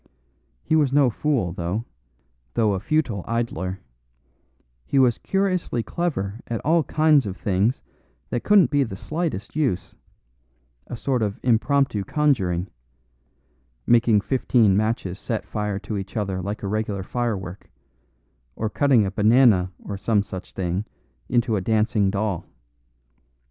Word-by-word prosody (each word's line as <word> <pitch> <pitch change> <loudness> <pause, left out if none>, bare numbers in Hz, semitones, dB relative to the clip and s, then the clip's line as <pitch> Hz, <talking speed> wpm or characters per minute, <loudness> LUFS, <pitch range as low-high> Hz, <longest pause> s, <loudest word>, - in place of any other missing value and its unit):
He 160 - +1
was 150 -4 +3
no 135 -3 +4
fool 120 - 0
though, 90 +6 -3 0.7
though 110 -3 +2
a 95 - -1
futile 125 - 0
idler; 95 -6 -2 1.0
he 135 - -1
was 125 -3 +4
curiously 185 -11 0
clever 115 - -3
at 115 -2 -2
all 165 +2 +3
kinds 155 -5 +3
of 95 - -5
things 105 +5 0 0.5
that 120 - -1
couldn't 200 -10 +5
be 145 -1 +3
the 110 -6 -5
slightest 155 - -4
use; 135 - -1 0.9
a 125 - -6
sort 130 0 -1
of 105 -2 -2
impromptu 125 -2 +2
conjuring; 95 - +1 1.2
making 115 -3 +4
fifteen 115 -4 +2
matches 105 -3 -1
set 115 -3 -3
fire 105 -2 -3
to 105 0 -4
each 95 +3 -7
other 95 -3 -2
like 100 +4 -5
a - - -2
regular 105 -1 -2
firework; 100 -5 -4 0.9
or 110 -1 -3
cutting 135 -7 +3
a 95 - -2
banana 105 -3 +4
or 100 - -5
some 105 -1 +2
such 95 -2 -8
thing 90 +1 -2 0.5
into 120 -2 +2
a 100 - 0
dancing 110 0 +2
doll. 100 -2 -1
110 Hz, 135 wpm, -23 LUFS, 100-130 Hz, 1.2 s, couldn't